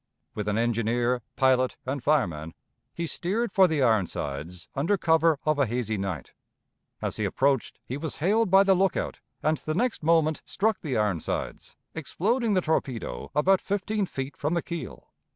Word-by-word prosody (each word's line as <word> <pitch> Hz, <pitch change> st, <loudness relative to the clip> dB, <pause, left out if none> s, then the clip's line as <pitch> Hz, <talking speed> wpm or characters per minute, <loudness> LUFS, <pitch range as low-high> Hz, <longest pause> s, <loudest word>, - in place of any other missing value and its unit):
With 105 Hz, -1 st, -4 dB
an 105 Hz, 0 st, +1 dB
engineer, 120 Hz, +1 st, +1 dB
pilot, 130 Hz, -1 st, +3 dB
and 130 Hz, 0 st, -3 dB
fireman, 85 Hz, -, 0 dB, 0.4 s
he 170 Hz, -, -4 dB
steered 200 Hz, +8 st, -2 dB
for 190 Hz, -2 st, +6 dB
the 155 Hz, -5 st, +1 dB
Ironsides 85 Hz, -, -1 dB
under 165 Hz, +9 st, +1 dB
cover 160 Hz, -2 st, +3 dB
of 155 Hz, -1 st, +2 dB
a 140 Hz, -, +3 dB
hazy 115 Hz, -1 st, -1 dB
night. 95 Hz, -4 st, -4 dB, 0.7 s
As -, -, -2 dB
he -, -, -1 dB
approached, 135 Hz, -2 st, +1 dB
he 130 Hz, -, -4 dB
was 155 Hz, +1 st, -4 dB
hailed 210 Hz, +6 st, +2 dB
by 195 Hz, +2 st, +7 dB
the 195 Hz, -1 st, +4 dB
lookout, 190 Hz, 0 st, 0 dB, 0.2 s
and 155 Hz, +1 st, +2 dB
the 155 Hz, -, -3 dB
next 245 Hz, +5 st, 0 dB
moment 160 Hz, -1 st, +2 dB
struck 215 Hz, -1 st, 0 dB
the 140 Hz, -7 st, -2 dB
Ironsides, 105 Hz, -6 st, -2 dB, 0.2 s
exploding 210 Hz, -, 0 dB
the 185 Hz, -, +3 dB
torpedo 130 Hz, -, -2 dB
about 185 Hz, +6 st, +4 dB
fifteen 200 Hz, 0 st, -1 dB
feet 135 Hz, -2 st, -5 dB
from 150 Hz, +4 st, -1 dB
the 170 Hz, -, 0 dB
keel. 170 Hz, -, -7 dB
150 Hz, 165 wpm, -27 LUFS, 120-185 Hz, 0.7 s, by